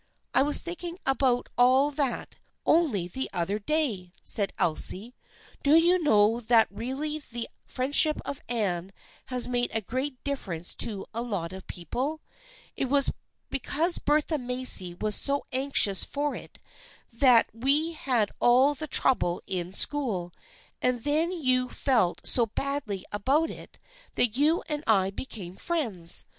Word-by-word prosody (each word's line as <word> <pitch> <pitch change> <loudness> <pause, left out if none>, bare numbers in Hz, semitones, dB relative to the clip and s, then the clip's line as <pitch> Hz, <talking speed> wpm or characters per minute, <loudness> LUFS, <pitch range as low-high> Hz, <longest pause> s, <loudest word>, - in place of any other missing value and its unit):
" - - -48
I 255 - +4
was 290 +2 +5
thinking 345 0 -6
about 265 -2 +1
all 260 +4 +4
that 280 -3 -3 0.3
only 265 - +1
the 260 +9 -4
other 185 +4 -2
day/' 215 - -2
said 200 -2 +4
Elsie. 190 +8 +3 0.3
" - - -26
Do 290 +2 +4
you 345 +2 +3
know 220 -5 +3
that 230 -1 +3
really 270 +8 -4
the 240 -5 -7 0.2
friendship 285 +4 +3
of 280 - -5
Anne 195 -6 -2 0.3
has 250 -2 +2
made 245 -1 -1
a - - +2
great 260 +6 -4
difference 185 - -4
to 210 -5 +1
a 230 - -3
lot 195 -8 -4
of 190 0 -11
people? 255 - -4 0.6
It 270 - -3
was 280 0 +4 0.4
because 315 +6 +2
Bertha 300 +1 0
Macy 250 -8 +2
was 210 +3 -1
so 280 0 0
anxious 260 -7 +4
for 290 0 -2
it - - -10 0.6
that 240 -1 +4
we 280 +8 0
had 250 -9 -1
all 255 +4 +4
that 310 +1 -6
trouble 175 -10 +2
in 180 -1 -4
school, 195 -7 -2 0.5
and 250 -2 0
then 310 +4 0
you 255 -7 0
felt 230 -10 0
so 235 -2 +2
badly 235 -5 -4
about 275 +10 0
it - - -12 0.4
that 235 -2 +1
you 305 +5 +2
and 300 -2 -4
I 195 -3 +3
became 195 -5 -8
friends 220 - +2
250 Hz, 150 wpm, -26 LUFS, 205-290 Hz, 0.6 s, was